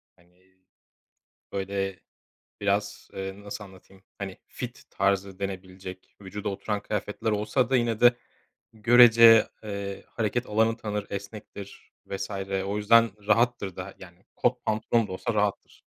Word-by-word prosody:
Hani, 90 +2 -29 1.0
böyle, 95 -2 -2 0.6
biraz, 100 0 -1
eee, 95 +1 -5
nasıl 105 0 -7
anlatayım. 95 0 -17 0.2
Hani, 95 -2 -6
fit 125 0 -7
tarzı 100 -1 0
denebilecek, 95 -1 -7
vücuda 100 +2 -5
oturan 105 +1 -2
kıyafetler 105 +2 -2
olsa 105 +4 +1
da 130 - +4
yine 115 -2 0
de 120 0 +7 0.6
görece, 115 0 +7 0.2
eee, 100 -2 -5
hareket 120 +2 -1
alanı 110 +2 +2
tanır, 105 -3 -3
esnektir 100 0 -8
vs. 100 0 -4 0.4
o 100 +1 -2
yüzden 115 +2 +5 0.2
rahattır 115 -5 +2
da, 95 +1 -7
yani, 90 0 -14
kot 125 0 0
pantolon 110 +1 +1
da - - -9
olsa 115 +5 -2
rahattır. 105 -1 -1
100 Hz, 130 wpm, -27 LUFS, 95-115 Hz, 1.0 s, de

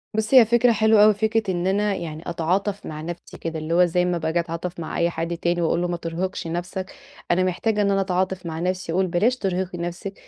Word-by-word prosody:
بُصّ 220 +3 -1
هي 255 -3 +9
فكرة 240 +2 +4
حلوة 220 -1 +5
أوي، 215 0 +7
فكرة 220 -1 0
إن 175 0 -1
أنا 205 +1 +1
يعني 160 -3 -6
أتعاطف 185 +5 -1
مع 155 0 -6
نفْسي 175 +2 -8
كده، 165 -1 -4
اللي 155 +2 -3
هو 180 +1 +5
زي 180 +1 +1
ما 180 -1 0
باجي 160 +1 0
أتعاطف 170 +1 -4
مع 160 - -5
أي 170 0 +2
حد 170 0 -3
تاني 175 0 0
وأقول 170 +1 +1
له 175 - 0
ما 175 - -2
ترهقش 170 +2 -4
نفْسك، 180 +3 -4 0.4
أنا 180 +1 +3
محتاجة 205 +4 0
إن 200 -1 +2
أنا 195 0 +2
أتعاطف 185 0 -1
مع 160 -1 -4
نفْسي، 185 0 -2
وأقول 185 +1 +2
بلاش 210 +9 +2
ترهقي 185 -3 -2
نفْسِك، 175 +3 -5
180 Hz, 230 wpm, -23 LUFS, 170-200 Hz, 0.4 s, هي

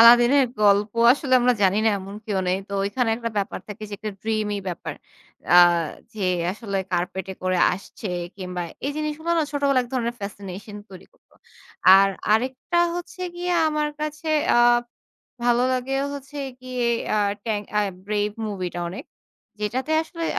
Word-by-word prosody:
আলাদিনের 240 +4 +8 0.2
গল্প 205 +1 +4 0.2
আসলে 270 -1 -3
আমরা 250 +1 +4
জানি 195 +1 +4
না - - +5
এমন 195 +1 -8
কেউ 205 -3 -1
নেই। 180 - +2
তো - - -9
ঐখানে 225 +3 0
একটা 230 0 -4
ব্যাপার 200 -1 -2
থাকে 210 +1 -8
যে - - -10
একটা 215 0 -4
ড্রিমী 215 -2 -1
ব্যাপার। 175 - -5 0.6
আ - - +9 0.6
যে 215 - -6 0.3
আসলে 200 -1 -5 0.2
কার্পেট 180 +2 -1
এ - - -10
করে 185 0 +1
আসছে 195 +2 -7 0.3
কিংবা 180 -2 -4 0.2
এই - - 0
জিনিসগুলো 305 +2 -3
না 320 - +3
ছোটবেলায় 280 -3 +2
এক - - -13
ধরনের 235 -1 -1
ফ্যাসিনেশন 200 0 -7
তৈরি 185 - -12
করতো। - - -31 0.6
আর 195 0 +5 0.2
আরেকটা 255 +9 0 0.2
হচ্ছে 355 +1 -7
গিয়ে 355 +1 -2 0.2
আমার 300 -1 0
কাছে 305 +1 -4 0.3
আ - - +5 0.9
ভালো 240 0 +3
লাগে 255 +1 -1 0.2
হচ্ছে 280 +1 -9 0.2
গিয়ে 255 -1 -3 0.3
আ - - +2 0.3
Tang 210 -2 -1
আ - - +4 0.3
Brave 210 0 -1
মুভি 195 -3 -3
টা - - -3
অনেক। 195 - -7 0.6
যেটাতে 255 +8 -1
আসলে 330 +1 -6
225 Hz, 160 wpm, -24 LUFS, 200-270 Hz, 0.9 s, আ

